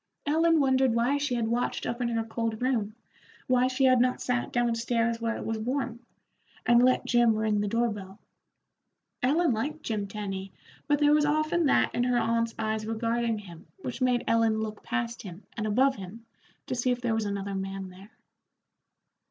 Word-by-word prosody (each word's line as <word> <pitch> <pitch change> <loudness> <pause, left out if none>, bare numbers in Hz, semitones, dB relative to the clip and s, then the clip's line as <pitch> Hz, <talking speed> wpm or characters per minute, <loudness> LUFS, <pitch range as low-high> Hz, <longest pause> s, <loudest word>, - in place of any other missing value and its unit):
Ellen 325 +2 +3
wondered 265 -3 +3
why 245 +5 +2
she 285 -3 -1
had 230 -2 0
watched 240 +2 -1
up 240 +1 -3
in 245 - +1
her 230 -1 -1
cold 225 -1 -3
room, 230 -5 -1 0.5
why 255 0 +3
she 260 +1 -1
had 255 -2 +5
not 250 0 +1
sat 245 -1 -1
down 240 -1 +1
stairs 230 0 0
where 230 0 -1
it - - -6
was 225 -1 -2
warm, 245 0 -2 0.7
and 240 0 +5
let 255 0 +3
Jim 240 -2 +4
ring 215 -1 +1
the 205 - -1
door 230 +3 +1
bell. 195 -1 -8 1.0
Ellen 310 +6 +3
liked 295 +7 -3
Jim 210 -3 -2
Tenny, 195 -2 -5 0.3
but 290 - +3
there 295 0 +4
was 300 0 +4
often 310 +2 +1
that - - +3
in 245 - +1
her 250 -1 +2
aunt's 230 0 0
eyes 220 -1 -2
regarding 230 0 0
him 175 -5 -11 0.2
which 250 +1 -5
made 250 -1 +2
Ellen 225 -1 +2
look 215 -1 -4
past 235 -1 -3
him 185 0 -10
and 215 -1 -2
above 260 +5 +3
him 200 +4 -9 0.4
to - - -4
see 250 0 0
if 245 -1 +1
there 240 -2 0
was 220 -1 0
another 200 -1 -3
man 195 0 -4
there. 190 +3 -14
235 Hz, 190 wpm, -28 LUFS, 220-255 Hz, 1.0 s, had